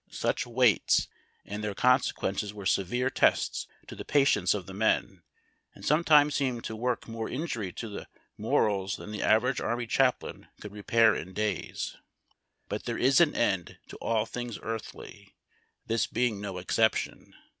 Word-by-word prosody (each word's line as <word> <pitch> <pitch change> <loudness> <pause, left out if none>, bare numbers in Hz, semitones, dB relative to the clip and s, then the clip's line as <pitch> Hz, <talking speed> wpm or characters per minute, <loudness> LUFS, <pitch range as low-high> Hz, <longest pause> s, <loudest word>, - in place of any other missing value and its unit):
Such - - -2
waits 120 -3 +3 0.4
and 105 +2 -6
their 105 -2 -3
conse 125 +3 +3
quences 100 +1 -3
Avere 100 -2 -4
severe 120 +9 0
tests - - +1 0.2
to - - -10
the - - -7
})atience 105 - +3
of 95 -4 -5
the 95 - -9
men, 110 +3 0 0.5
and - - -11
sometimes 150 -1 +4
seemed 130 -5 -1
to 110 - -5
work 120 +1 -2
more 115 -1 -5
injury 120 - -3
to 115 - -6
their 105 - -8 0.3
morals 100 -2 0
tlian 105 - -9
the 105 - -4
average 125 +4 +2
army 120 0 -2
chaplain 125 +2 0
could 105 - -9
repair 110 +2 +3
in 95 0 -6
days. 105 +2 -3 0.7
But - - -5
there 115 - -2
is 135 +5 +4
an 165 -3 +3
end 95 -7 0
to - - -9
all 110 -1 0
things 120 -1 -6
earthly, 115 0 -8 0.5
this 115 0 0
being 115 -4 -1
no 100 -3 -5
exception. 110 +5 0
115 Hz, 160 wpm, -28 LUFS, 105-125 Hz, 0.7 s, sometimes